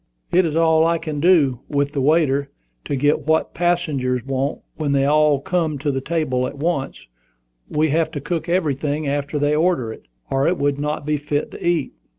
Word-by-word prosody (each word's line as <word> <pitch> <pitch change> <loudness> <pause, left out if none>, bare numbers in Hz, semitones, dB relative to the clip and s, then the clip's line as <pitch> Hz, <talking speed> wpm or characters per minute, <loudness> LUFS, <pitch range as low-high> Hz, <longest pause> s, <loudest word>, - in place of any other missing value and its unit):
"It 180 0 +4
is 155 - -3
all 160 -1 +4
I 170 0 +2
can 155 -3 -5
do, 145 -7 +4
with 145 -1 0
the 140 -2 -2
waiter, 140 -1 +2 0.4
to - - -2
get 145 +2 +1
what 160 0 +1
the - - -19
passengers 145 -8 0
want 135 +2 -2
when 145 -3 -1
they 135 0 +2
all 150 0 +3
come 160 0 -1
to 145 +1 -1
the 135 -1 -2
table 130 -5 -1
at - - -8
once. 145 -2 -2 0.6
We 155 +1 +1
have 160 +2 +1
to 145 - -3
cook 170 +4 -3
everything 150 -3 0
after 140 +1 -2
they 145 +1 +1
order 155 -9 +1
it, - - -16 0.2
or 135 0 +2
it 180 - +1
would 145 0 0
not 150 0 -3
be 150 0 0
fit 145 0 -2
to - - -9
eat." 170 -5 0
150 Hz, 200 wpm, -21 LUFS, 140-160 Hz, 0.6 s, It